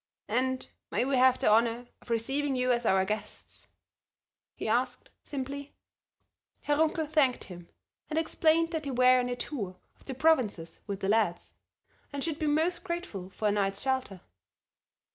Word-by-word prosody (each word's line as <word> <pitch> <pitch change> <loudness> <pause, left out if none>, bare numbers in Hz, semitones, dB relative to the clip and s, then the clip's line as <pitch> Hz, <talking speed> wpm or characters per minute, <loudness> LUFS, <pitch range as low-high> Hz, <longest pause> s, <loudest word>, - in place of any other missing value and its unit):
"And 255 +3 0 0.2
may - - 0
we 275 0 +1
have 255 0 +5
the - - 0
honor 230 +2 +3
of - - -18
receiving 270 +5 0
you 250 0 +1
as 240 -1 +1
our 190 0 +3
guests?" 215 +2 -6 0.9
he - - -5
asked, - - -1
simply. 280 +1 -6 0.9
Herr 290 0 +1
Runkel 320 +1 +2
thanked 290 -5 +2
him, 175 -2 -10 0.4
and 310 - -2
explained 325 0 +2
that 320 -2 -1
they 285 - -5
were 255 0 +5
on 250 0 -1
a 245 - -1
tour 215 -8 -4 0.2
of - - -24
the 265 - -5
provinces 245 - +1
with 200 -1 -4
the 195 - -1
lads, 210 -5 +1 0.6
and 280 -1 -3
should 320 -2 -2
be 310 - 0
most 330 +4 +1
grateful 340 - -5
for 210 +2 -1
a - - +2
night's 195 -1 0
shelter. 260 -9 -1
255 Hz, 165 wpm, -29 LUFS, 215-295 Hz, 0.9 s, have